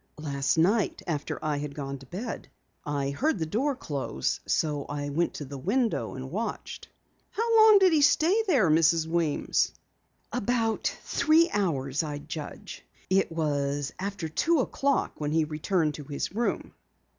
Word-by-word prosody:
"Last 140 Hz, -1 st, -1 dB
night 195 Hz, +6 st, +2 dB
after 150 Hz, -4 st, -3 dB
I 150 Hz, -1 st, 0 dB
had 145 Hz, -1 st, -5 dB
gone 140 Hz, -2 st, -5 dB
to 135 Hz, -, -14 dB
bed. 220 Hz, -, -6 dB, 0.3 s
I 140 Hz, -1 st, -2 dB
heard 275 Hz, -, 0 dB
the 160 Hz, -, -1 dB
door 260 Hz, -, 0 dB
close, 140 Hz, -, -3 dB
so 150 Hz, -3 st, 0 dB
I 145 Hz, 0 st, -4 dB
went 165 Hz, +4 st, 0 dB
to 145 Hz, -, -5 dB
the 140 Hz, 0 st, -8 dB
window 225 Hz, -, 0 dB
and 130 Hz, 0 st, -7 dB
watched." 220 Hz, +6 st, -4 dB, 0.4 s
"How 460 Hz, +1 st, 0 dB
long 435 Hz, -1 st, +8 dB
did 375 Hz, -3 st, +5 dB
he 305 Hz, -, +4 dB
stay 330 Hz, +8 st, +4 dB
there, 245 Hz, -, +4 dB
Mrs. 160 Hz, +1 st, +4 dB
Weems?" 160 Hz, -2 st, 0 dB, 0.6 s
"About 230 Hz, -1 st, 0 dB, 0.2 s
three 325 Hz, +2 st, +3 dB
hours 145 Hz, -9 st, 0 dB
I'd 145 Hz, -2 st, -6 dB
judge. 155 Hz, -3 st, -7 dB, 0.3 s
It 195 Hz, -2 st, +3 dB
was 145 Hz, -3 st, -1 dB
after 195 Hz, -3 st, -3 dB
two 320 Hz, -, +1 dB
o'clock 280 Hz, +2 st, -1 dB
when 150 Hz, 0 st, -1 dB
he 160 Hz, 0 st, +3 dB
returned 155 Hz, +1 st, 0 dB
to 150 Hz, -, -8 dB
his 145 Hz, +5 st, -4 dB
room." 235 Hz, +3 st, -2 dB
160 Hz, 155 wpm, -27 LUFS, 145-230 Hz, 0.6 s, long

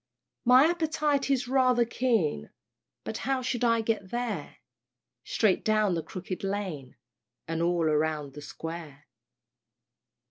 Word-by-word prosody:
My 255 Hz, +3 st, +7 dB
appetite 305 Hz, -4 st, +1 dB
is 260 Hz, -2 st, +1 dB
rather 255 Hz, -2 st, +3 dB
keen, 225 Hz, -, 0 dB, 0.5 s
But -, -, -4 dB
how 265 Hz, -1 st, -1 dB
shall 245 Hz, -1 st, -1 dB
I 230 Hz, 0 st, +3 dB
get 215 Hz, -4 st, -2 dB
there? 230 Hz, -9 st, -4 dB, 0.7 s
"Straight 210 Hz, -, +1 dB
down 215 Hz, -3 st, +2 dB
the 165 Hz, -, -1 dB
Crooked 185 Hz, +4 st, -6 dB
Lane, 190 Hz, -10 st, -4 dB, 0.5 s
And 165 Hz, 0 st, -2 dB
all 170 Hz, -1 st, +1 dB
round 150 Hz, -2 st, 0 dB
the 150 Hz, -, -9 dB
Square." 155 Hz, -1 st, -8 dB
205 Hz, 120 wpm, -28 LUFS, 160-250 Hz, 0.7 s, My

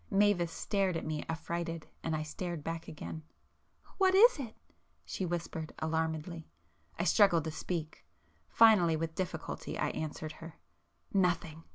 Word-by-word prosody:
Mavis 195 Hz, -4 st, +3 dB
stared 195 Hz, -1 st, 0 dB
at -, -, -5 dB
me 155 Hz, -1 st, -2 dB
affrighted, 165 Hz, 0 st, -3 dB, 0.2 s
and 160 Hz, -1 st, -1 dB
I 155 Hz, -, -1 dB
stared 170 Hz, 0 st, -5 dB
back 165 Hz, +1 st, -4 dB
again. 160 Hz, 0 st, -6 dB, 0.8 s
"What 380 Hz, -1 st, +5 dB
is 450 Hz, -2 st, +7 dB
it?" 235 Hz, -5 st, -6 dB, 0.5 s
she 185 Hz, -, -3 dB
whispered 165 Hz, -2 st, -4 dB
alarmedly. 160 Hz, +1 st, -2 dB, 0.5 s
I -, -, 0 dB
struggled 195 Hz, -7 st, +5 dB
to 160 Hz, -, -3 dB
speak,—finally, 175 Hz, +3 st, +1 dB
with 160 Hz, 0 st, -2 dB
difficulty 180 Hz, +1 st, -4 dB
I -, -, 0 dB
answered 155 Hz, 0 st, -4 dB
her— 165 Hz, -1 st, -9 dB, 0.6 s
"Nothing!" 170 Hz, -4 st, +1 dB
165 Hz, 135 wpm, -32 LUFS, 160-185 Hz, 0.8 s, is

